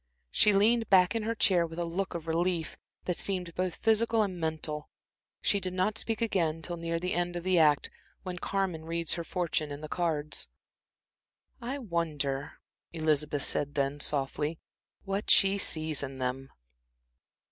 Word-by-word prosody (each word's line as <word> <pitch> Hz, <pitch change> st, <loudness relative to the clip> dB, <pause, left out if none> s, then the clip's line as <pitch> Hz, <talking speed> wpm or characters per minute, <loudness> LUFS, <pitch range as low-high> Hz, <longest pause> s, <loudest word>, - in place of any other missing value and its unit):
She 210 Hz, -, +5 dB
leaned 225 Hz, +3 st, +3 dB
back 185 Hz, 0 st, +6 dB
in 225 Hz, -, 0 dB
her 225 Hz, +2 st, -1 dB
chair 180 Hz, -6 st, +3 dB
with 165 Hz, 0 st, -10 dB
a 175 Hz, -, -1 dB
look 180 Hz, +2 st, -3 dB
of 165 Hz, -2 st, -5 dB
relief, 170 Hz, 0 st, 0 dB, 0.3 s
that 180 Hz, -, -1 dB
seemed 180 Hz, -3 st, -2 dB
both 180 Hz, -1 st, -1 dB
physical 225 Hz, 0 st, +3 dB
and 185 Hz, -3 st, -3 dB
mental. 155 Hz, -2 st, -3 dB, 0.5 s
She 200 Hz, -, +3 dB
did 185 Hz, -1 st, -4 dB
not 185 Hz, +4 st, +1 dB
speak 225 Hz, 0 st, -2 dB
again 165 Hz, -7 st, 0 dB
till 175 Hz, -, -2 dB
near 165 Hz, 0 st, -2 dB
the 180 Hz, +2 st, -2 dB
end 175 Hz, 0 st, -1 dB
of 175 Hz, -, -4 dB
the 185 Hz, -1 st, +3 dB
act, 150 Hz, -2 st, +4 dB, 0.3 s
when 180 Hz, -2 st, -5 dB
Carmen 185 Hz, -5 st, -1 dB
reads 165 Hz, 0 st, -1 dB
her 170 Hz, -, -2 dB
fortune 165 Hz, -4 st, -1 dB
in 145 Hz, +1 st, -6 dB
the 155 Hz, -, -5 dB
cards. 155 Hz, -3 st, -2 dB, 1.1 s
"I 250 Hz, +4 st, -3 dB
wonder," 155 Hz, -, -2 dB, 0.4 s
Elizabeth 150 Hz, -3 st, 0 dB
said 145 Hz, 0 st, -1 dB
then, 140 Hz, 0 st, 0 dB
softly, 145 Hz, +2 st, -1 dB, 0.5 s
"what 195 Hz, +2 st, -3 dB
she 195 Hz, 0 st, +5 dB
sees 155 Hz, -4 st, +1 dB
in 135 Hz, -1 st, -5 dB
them." 130 Hz, +1 st, -3 dB
170 Hz, 165 wpm, -30 LUFS, 155-190 Hz, 1.1 s, back